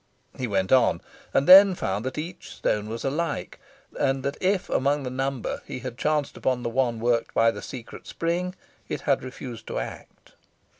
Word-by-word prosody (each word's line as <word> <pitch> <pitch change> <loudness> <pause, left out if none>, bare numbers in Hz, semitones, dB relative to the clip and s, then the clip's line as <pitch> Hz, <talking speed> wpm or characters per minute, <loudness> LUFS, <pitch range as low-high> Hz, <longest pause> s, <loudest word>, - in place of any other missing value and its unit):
He 125 - -3
went 95 -3 0
on, 130 -3 +4 0.3
and 135 - +2
then 190 0 +10
found 105 - -2
that 130 - -4
each 170 +4 -6
stone 105 0 -1
was 115 +3 -5
alike, 155 +3 -2 0.4
and 135 0 +1
that 140 +1 -2
if 190 0 +1
amongst 140 +2 +1
the 125 - -4
number 135 -1 -2
he - - -5
had 125 -1 -6
chanced 150 +1 0
upon 125 -2 -1
the 120 - -1
one 120 -1 0
worked 115 0 0
by 115 0 +5
the - - -8
secret 125 -4 -9
spring, 175 +2 -2 0.3
it - - -3
had 140 -3 +1
refused 125 -3 -8
to - - -4
act. - - -8
130 Hz, 185 wpm, -25 LUFS, 115-150 Hz, 0.4 s, then